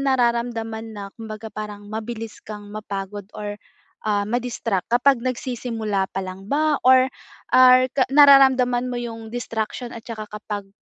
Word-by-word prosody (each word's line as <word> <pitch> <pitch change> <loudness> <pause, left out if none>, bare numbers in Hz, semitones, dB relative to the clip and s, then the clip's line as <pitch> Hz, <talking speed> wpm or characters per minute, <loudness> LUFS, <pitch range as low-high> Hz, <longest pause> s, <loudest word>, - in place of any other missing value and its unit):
nararamdaman 235 -4 -1
na, 200 - -6
kumbaga 220 -1 -8
parang, 210 -1 -7
mabilis 225 0 -6
kang 205 -1 -9
mapagod 205 -1 -6
or, 205 0 -6 0.4
ah, 205 -1 +1
madistract? 230 -5 -1
Kapag 245 +1 +4
nagsisimula 235 -5 -2
pa 190 - -2
lang 185 +1 -8
ba, 300 +2 +2
or, 260 0 +6 0.4
or 255 0 +8
ka 265 - +3
nararamdaman 265 -3 +6
mo 245 - -3
'yong 225 -2 -6
distraction 235 0 -4
at - - -7
'tsaka 215 -2 -7
kapag, 210 -1 -6
225 Hz, 140 wpm, -22 LUFS, 210-250 Hz, 0.4 s, or